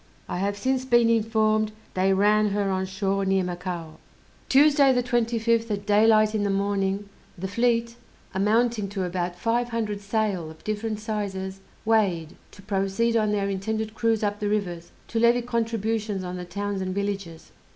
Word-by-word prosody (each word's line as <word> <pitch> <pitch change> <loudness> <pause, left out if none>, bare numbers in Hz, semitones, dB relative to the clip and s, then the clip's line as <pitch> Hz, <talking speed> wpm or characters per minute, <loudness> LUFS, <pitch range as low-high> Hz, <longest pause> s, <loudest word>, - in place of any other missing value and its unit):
I - - -3
have 200 +1 -1
since 260 +3 0
been 240 -2 +4
informed 215 -1 +2 0.2
they 190 +1 +2
ran 210 +2 +3
her 200 -1 0
on 190 0 -1
shore 195 +1 -1
near 190 -1 +2
Macao. 175 -2 -5 0.5
Tuesday, 280 0 +6
the 250 -1 +2
25th, 230 -1 +1
at 205 -1 -3
daylight 215 +1 +4
in 215 - 0
the 205 - 0
morning, 200 0 0 0.3
the 190 +2 -4
fleet, 235 +2 0 0.4
amounting 215 +2 +1
to 195 -1 -3
about 175 0 -2
five 235 +5 0
hundred 215 -3 -2
sail 200 -5 -1
of 160 0 -14
different 215 0 -3
sizes, 195 -3 -4 0.3
weighed, 190 -8 +1
to 200 - -16
proceed 195 +3 0
on 215 -2 +2
their 200 -1 0
intended 215 +3 -2
cruise 225 -1 +1
up 205 0 -1
the 205 - -1
rivers, 175 -5 -2 0.2
to 230 - -1
levy 235 +1 +4
contributions 225 -4 -1
on 180 0 -5
the 180 0 -6
towns 200 +2 -3
and 185 0 -3
villages. 195 -5 -4
205 Hz, 165 wpm, -25 LUFS, 195-225 Hz, 0.5 s, Tuesday